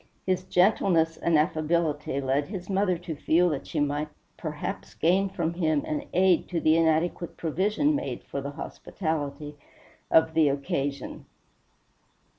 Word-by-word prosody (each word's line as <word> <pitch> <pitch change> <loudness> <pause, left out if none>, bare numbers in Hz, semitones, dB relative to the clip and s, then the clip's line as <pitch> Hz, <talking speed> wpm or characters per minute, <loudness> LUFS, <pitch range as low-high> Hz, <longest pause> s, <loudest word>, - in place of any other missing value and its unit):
His 185 -1 0
gentleness 180 -3 +3
and 170 -2 +2
affability 155 -2 0
led 135 +2 0
his 190 -1 -6
mother 190 -2 +2
to 170 -2 -6
feel 170 +4 +3
that 145 -4 -4
she 155 - -2
might 145 +1 0 0.3
perhaps 155 -3 -5
gain 190 +4 +2
from 170 -3 -2
him 155 -4 +1
an 150 - -3
aid 185 -1 +3
to 175 - -1
the 155 0 +4
inadequate 165 +1 +1
provision 205 - +1
made 285 - -4
for 140 - -5
the 140 - -4
hospitality 150 -1 -4 0.5
of 160 0 +4
the 160 -3 +4
occasion. 140 0 -3
160 Hz, 140 wpm, -27 LUFS, 150-180 Hz, 0.5 s, the